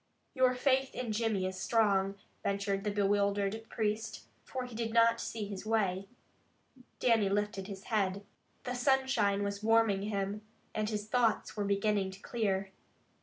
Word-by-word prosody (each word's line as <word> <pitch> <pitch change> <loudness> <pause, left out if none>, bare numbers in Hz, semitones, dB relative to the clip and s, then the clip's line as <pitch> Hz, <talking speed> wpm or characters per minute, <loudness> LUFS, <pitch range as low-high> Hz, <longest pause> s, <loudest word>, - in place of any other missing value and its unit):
"Your 255 -2 +3
faith 265 +1 +1
in 245 -3 -3
Jimmy 215 -3 0
is 185 0 -4
strong," 200 -3 +2 0.3
ventured 200 0 -1
the 210 - 0
bewildered 200 +1 +1
priest, 215 0 -2 0.2
for 255 -1 -4
he 250 - -10
did 225 0 -3
not 230 0 +5
see 220 -2 -4
his 200 -2 -6
way. 200 -4 0 0.9
Dannie 225 -5 +3
lifted 200 -1 -1
his 195 -1 -8
head. 200 -3 0 0.4
The 250 - -3
sunshine 245 -6 +2
was 200 0 -3
warming 225 -3 +3
him, 200 0 -2 0.3
and 215 0 -1
his 210 -1 -3
thoughts 230 -2 +1
were 205 -2 -1
beginning 200 -1 +1
to 190 +1 -10
clear. 195 -4 -1
210 Hz, 150 wpm, -32 LUFS, 200-230 Hz, 0.9 s, not